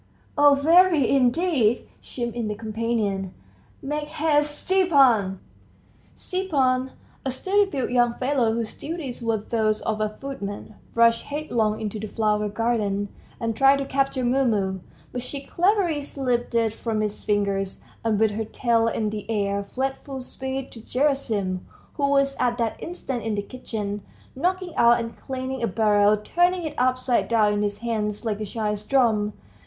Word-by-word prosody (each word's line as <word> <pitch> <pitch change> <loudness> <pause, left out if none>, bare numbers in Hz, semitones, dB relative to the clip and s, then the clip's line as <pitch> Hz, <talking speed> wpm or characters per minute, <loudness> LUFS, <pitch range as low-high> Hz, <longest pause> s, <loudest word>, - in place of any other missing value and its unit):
"Oh, 290 -1 +6
very, 325 -1 +5
indeed!" 260 -2 +2
chimed 240 -2 -4
in 235 -2 -2
the 210 - -2
companion. 215 -3 -2 0.5
"Make 295 +2 -3
haste, 295 -1 +1
Stepan!" 270 - +3 0.8
Stepan, 270 -9 0 0.3
a 270 - -1
sturdy 390 +10 +1
built 265 -8 -2
young 240 -1 +3
fellow, 255 -3 +1
whose 225 -1 -3
duties 295 -6 -5
were 230 -1 +1
those 215 0 0
of 215 -1 -2
a 215 - +1
footman, 215 -7 -6 0.2
rushed 230 0 +4
headlong 235 -8 -1
into 215 0 -4
the 215 - -5
flower 210 -1 0
garden, 205 -3 0 0.3
and 230 -1 -2
tried 270 +4 +5
to 275 - -2
capture 270 -1 0
Mumu, 225 -7 +1 0.3
but 245 - -4
she 275 +3 -5
cleverly 350 -1 +1
slipped 250 -4 -2 0.2
from 225 -1 -2
his 210 -1 -3
fingers, 200 -2 0 0.2
and 220 -2 +1
with 220 -1 +3
her 220 +2 -3
tail 230 0 +1
in 215 -2 -1
the 210 0 -6
air, 200 -2 0
fled 265 +6 -3
full 270 -2 -6
speed 265 +1 -4
to 230 - -10
Gerasim, 230 -8 0 0.3
who 280 -1 0
was 275 -1 +2
at 240 -1 +1
that 230 -2 -2
instant 275 -8 -4
in 220 -1 -2
the 205 - -2
kitchen, 210 -3 -5 0.3
knocking 360 +4 -1
out 235 0 +6
and 230 0 -5
cleaning 260 -1 -5
a 230 - +1
barrel, 210 0 +3
turning 350 - +1
it 310 -2 -4
upside 255 0 +2
down 215 -3 +3
in 205 - 0
his 205 -1 -1
hands 210 -1 -2
like 215 -2 -1
a - - -2
child's 210 0 -3
drum. 215 -4 +2
235 Hz, 160 wpm, -24 LUFS, 215-275 Hz, 0.8 s, Oh